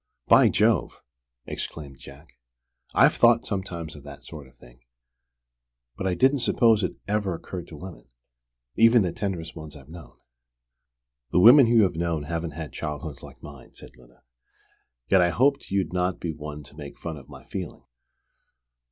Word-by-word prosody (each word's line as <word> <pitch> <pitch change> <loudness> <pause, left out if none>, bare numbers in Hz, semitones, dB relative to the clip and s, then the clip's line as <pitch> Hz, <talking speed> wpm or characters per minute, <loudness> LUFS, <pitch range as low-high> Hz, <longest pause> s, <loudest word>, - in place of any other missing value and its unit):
"By - - +6
Jove!" - - +1 0.4
exclaimed 70 -4 -7
Jack. 70 +2 -15 0.6
"I've - - +5
thought - - +4
sometimes 85 -5 -5
of 75 - -11
that 70 0 -12
sort 75 -4 -10
of 65 -1 -24
thing. - - -18 1.2
But 95 - -3
I 90 - 0
didn't 135 +5 +3
suppose 115 -3 +3
it - - -2
ever 100 -3 -1
occurred 90 +1 -8
to 80 - -11
women, 85 -8 -11 0.7
even 115 0 +5
the 90 - -1
tenderest 85 -4 -5
ones 80 -2 -10
I've 70 -1 -15
known." 85 0 -13 1.1
"The 90 - +2
women 120 +6 +8
you 115 -1 +5
have 95 - +1
known 85 -2 -2
haven't 85 0 -4
had 80 -2 -7
childhoods 75 -2 -6
like - - -14
mine," 70 -3 -13
said - - -14
Lyda. 60 0 -22 0.8
"Yet 95 -2 +4
I 90 - +3
hoped 135 +10 +1
you'd 95 -4 -1
not 90 0 -1
be 85 - -3
one 75 -1 -8
to 70 - -17
make 75 -2 -10
fun 85 -2 -6
of 70 - -14
my - - -12
feeling. 90 -5 -7
85 Hz, 165 wpm, -25 LUFS, 75-95 Hz, 1.2 s, women